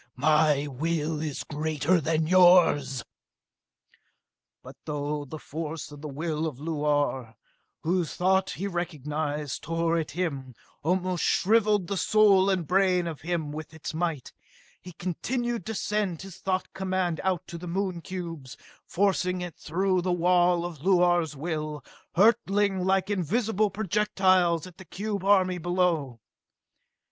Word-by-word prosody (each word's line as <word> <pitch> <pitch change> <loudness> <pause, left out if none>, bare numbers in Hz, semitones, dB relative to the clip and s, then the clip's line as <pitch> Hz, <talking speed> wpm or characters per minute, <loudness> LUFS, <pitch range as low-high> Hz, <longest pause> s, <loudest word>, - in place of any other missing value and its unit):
My 150 +1 +3
will 155 +2 -2
is 150 -3 -4
greater 155 +3 0
than 160 +1 0
yours!" 165 -8 +5 1.6
But - - -11
though 145 0 -3
the 150 +3 -8
force 155 0 -6
of 145 -1 -11
the 155 - -6
will 155 +2 -2
of 145 -6 -6
Luar, 145 -6 -1 0.5
whose 175 0 0
thought 190 +1 +2
he 195 - -4
recognized, 150 -5 -3
tore 165 +1 0
at 160 - -3
him, 140 -8 -4 0.3
almost 180 +2 0
shriveled 210 -1 +3
the 200 +3 -3
soul 200 -2 +4
and 185 -4 0
brain 185 +1 +2
of 165 -3 -5
him 160 -2 -2
with 155 +1 -8
its 160 - -6
might, 160 -5 -3 0.5
he 180 - -11
continued 235 +6 -3
to 225 - -3
send 200 -5 -1
his 195 -3 -10
thought 185 -1 -2
command 185 -3 -1
out 185 -4 0
to 170 - -8
the 180 - -8
Moon 185 0 -2
cubes, 165 -8 -7 0.3
forcing 185 -1 +1
it 175 -2 -6
through 185 +3 0
the 180 +1 -1
wall 175 0 +3
of 170 -4 -7
Luar's 175 -3 +3
will, 155 -1 -4 0.3
hurling 205 -1 +3
it 185 - -2
like 190 +1 +1
invisible 210 +3 +1
projectiles 190 -4 +2
at 180 0 -14
the 190 - -11
cube 200 +1 -4
army 185 -2 +3
below. 170 -8 0
175 Hz, 140 wpm, -27 LUFS, 155-190 Hz, 1.6 s, yours